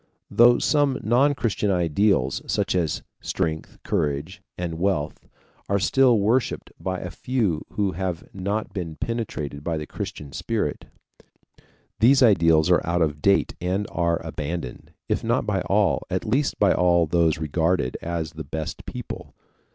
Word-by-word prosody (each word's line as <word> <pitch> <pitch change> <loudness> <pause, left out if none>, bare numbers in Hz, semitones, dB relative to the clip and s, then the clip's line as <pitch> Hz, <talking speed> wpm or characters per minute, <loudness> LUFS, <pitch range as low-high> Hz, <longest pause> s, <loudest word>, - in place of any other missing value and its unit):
Though 120 +1 +6
some 145 -3 +2
non 135 +6 +3
Christian 110 -5 -1
ideals, 90 -5 +2
such - - 0
as 85 -5 -1 0.2
strength, 80 -1 -3
courage, 75 +5 -2 0.2
and 85 -2 -4
wealth, 85 -6 -1 0.4
are 100 - +3
still 125 +5 +4
worshiped 110 +5 0
by 95 -1 -2
a 90 - -6
few 110 -12 -1
who 100 -2 0
have 90 -1 -4
not 100 +3 -3
been 85 -5 -4
penetrated 75 -8 -4
by 80 0 -1
the 75 - -4
Christian 70 -1 -7
spirit, - - -2 1.1
these 130 +4 +6
ideals 85 -6 +4
are 90 - +5
out 85 0 +1
of 75 -1 -2
date 100 +3 +3
and 95 +3 -1
are 85 0 +1
abandoned, 75 -3 -5 0.2
if - - -1
not - - +1
by - - 0
all, - - +2
at - - -2
least 135 +6 0
by 100 - +4
all 85 -1 +3
those 80 0 +2
regarded 80 -2 0
as 85 -2 -3
the 80 -1 -7
best 80 +2 -6
people. - - -7
90 Hz, 150 wpm, -24 LUFS, 80-105 Hz, 1.1 s, Though